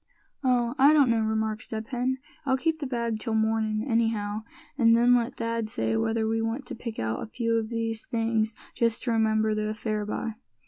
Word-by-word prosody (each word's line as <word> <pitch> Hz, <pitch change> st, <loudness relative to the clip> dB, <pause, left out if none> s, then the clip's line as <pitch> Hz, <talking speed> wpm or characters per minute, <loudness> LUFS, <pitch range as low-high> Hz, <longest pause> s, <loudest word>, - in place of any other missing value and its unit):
"Oh! 245 Hz, -2 st, +2 dB
I 280 Hz, +3 st, +7 dB
don't 280 Hz, -5 st, +5 dB
know," 230 Hz, -1 st, +2 dB
remarked 220 Hz, 0 st, -1 dB
Step 220 Hz, -2 st, -5 dB
Hen, 255 Hz, 0 st, 0 dB, 0.3 s
"I'll 265 Hz, -2 st, +2 dB
keep 320 Hz, +3 st, 0 dB
the 285 Hz, -, -3 dB
bag 235 Hz, -3 st, -2 dB
till 225 Hz, 0 st, -2 dB
mornin' 220 Hz, -1 st, +1 dB
anyhow, 225 Hz, -3 st, 0 dB, 0.3 s
an' 230 Hz, -4 st, +5 dB
then 240 Hz, +1 st, +5 dB
let 235 Hz, 0 st, 0 dB
Thad 230 Hz, -1 st, -2 dB
say 110 Hz, -, -1 dB
whether 220 Hz, -, +1 dB
we 225 Hz, 0 st, 0 dB
want 225 Hz, +4 st, -2 dB
to -, -, -6 dB
pick 230 Hz, -1 st, -6 dB
out 110 Hz, 0 st, -2 dB
a -, -, -5 dB
few 230 Hz, 0 st, -1 dB
of 220 Hz, -1 st, -2 dB
these 225 Hz, -1 st, -2 dB
things, 225 Hz, -1 st, 0 dB, 0.2 s
just 230 Hz, -1 st, +1 dB
to 245 Hz, -, 0 dB
remember 220 Hz, -1 st, +2 dB
the 215 Hz, 0 st, -1 dB
affair 215 Hz, 0 st, -2 dB
by." 220 Hz, +1 st, -3 dB
225 Hz, 200 wpm, -27 LUFS, 220-235 Hz, 0.3 s, I